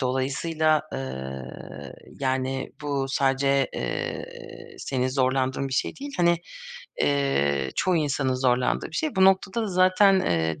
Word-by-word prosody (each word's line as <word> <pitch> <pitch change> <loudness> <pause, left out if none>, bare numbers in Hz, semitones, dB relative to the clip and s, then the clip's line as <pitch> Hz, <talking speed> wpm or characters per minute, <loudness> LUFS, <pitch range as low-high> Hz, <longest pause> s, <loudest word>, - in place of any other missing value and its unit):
dolayısıyla, 145 +4 +1
eee, 65 - -5 0.8
yani 130 0 -1
bu 140 -2 -1
sadece, 135 0 +2
eee, 460 -2 -6
senin 130 -1 -1
zorlandığın 130 0 0
bir - - -7
şey 130 - -1
değil. 280 +1 -7
Hani, 170 -1 +4 0.6
eee, 70 - +1
çoğu 185 -1 +2
insanın 140 -4 0
zorlandığı 125 -1 +1
bir - - -6
şey. 310 -9 -2
Bu 190 - +5
noktada 195 +3 +3
da 215 - -2
zaten, 185 +1 +4
eee, 80 - 0
135 Hz, 130 wpm, -25 LUFS, 130-185 Hz, 0.8 s, Bu